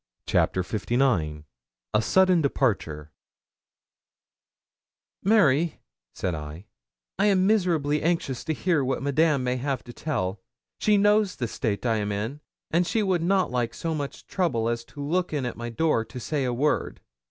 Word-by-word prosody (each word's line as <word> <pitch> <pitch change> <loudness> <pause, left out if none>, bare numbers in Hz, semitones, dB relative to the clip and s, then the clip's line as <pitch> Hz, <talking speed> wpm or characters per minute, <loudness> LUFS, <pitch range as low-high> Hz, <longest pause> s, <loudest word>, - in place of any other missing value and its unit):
CHAPTER 95 - +2
LIX 100 - 0 0.5
A 105 - +4
SUDDEN 185 +7 +4
DEPARTURE 95 - -1 2.1
'Mary,' 170 -7 +3 0.4
said 90 - -2
I, 75 +4 -7 0.5
'I 200 - +4
am 190 -2 +3
miserably 170 -8 +2
anxious 165 -6 -1
to 160 - 0
hear 165 -5 +1
what 130 +1 -1
Madame 145 0 +2
may 125 0 0
have 135 +1 -2
to 120 - -11
tell; 100 -12 -2 0.4
she 210 -1 +3
knows 205 -1 +3
the 120 - -2
state 110 -1 -3
I 115 -2 +2
am 105 -1 -2
in, 110 +9 -3 0.3
and 170 +2 +2
she 220 +2 +1
would 185 -4 +1
not 190 0 +2
like 120 -2 -1
so 165 -1 -2
much 145 -3 -5
trouble 120 -12 0
as 115 0 -2
to 145 +4 -8
look 175 +3 0
in 140 -4 -1
at 120 - -3
my 120 0 -5
door 120 -1 +1
to 125 - -8
say 140 +3 -1
a 125 - 0
word. 145 +5 0
140 Hz, 160 wpm, -26 LUFS, 115-170 Hz, 2.1 s, A